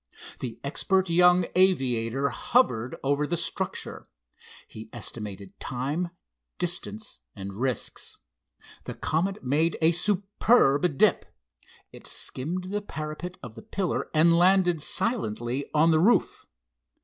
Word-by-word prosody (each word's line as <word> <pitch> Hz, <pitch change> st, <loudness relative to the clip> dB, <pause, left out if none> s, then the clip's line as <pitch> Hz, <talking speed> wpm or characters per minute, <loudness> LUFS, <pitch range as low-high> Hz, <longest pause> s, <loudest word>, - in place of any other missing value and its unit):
The 115 Hz, -3 st, -6 dB
expert 190 Hz, +6 st, 0 dB
young 180 Hz, +1 st, +5 dB
aviator 135 Hz, -8 st, +2 dB
hovered 125 Hz, -, +1 dB
over 145 Hz, +2 st, +1 dB
the 170 Hz, -, -1 dB
structure. -, -, -3 dB, 0.6 s
He 110 Hz, +1 st, -11 dB
estimated 105 Hz, -4 st, -7 dB
time, 145 Hz, +8 st, -3 dB, 0.5 s
distance 205 Hz, +5 st, -2 dB, 0.2 s
and 100 Hz, 0 st, -7 dB
risks. 130 Hz, -3 st, -2 dB, 0.7 s
The -, -, -6 dB
Comet 190 Hz, +6 st, -1 dB
made 150 Hz, +6 st, +1 dB
a 160 Hz, +1 st, +4 dB
superb 180 Hz, -, +2 dB
dip. -, -, +3 dB, 0.6 s
It -, -, -10 dB
skimmed 180 Hz, +8 st, -4 dB
the 205 Hz, 0 st, -1 dB
parapet 155 Hz, 0 st, -6 dB
of 120 Hz, -3 st, -8 dB
the 115 Hz, -, -11 dB
pillar 190 Hz, -, -3 dB
and 165 Hz, +2 st, +4 dB
landed 180 Hz, -2 st, +4 dB
silently 130 Hz, -, 0 dB
on 160 Hz, +2 st, +4 dB
the 160 Hz, -, +4 dB
roof. 215 Hz, +9 st, +2 dB
160 Hz, 115 wpm, -26 LUFS, 130-180 Hz, 0.7 s, young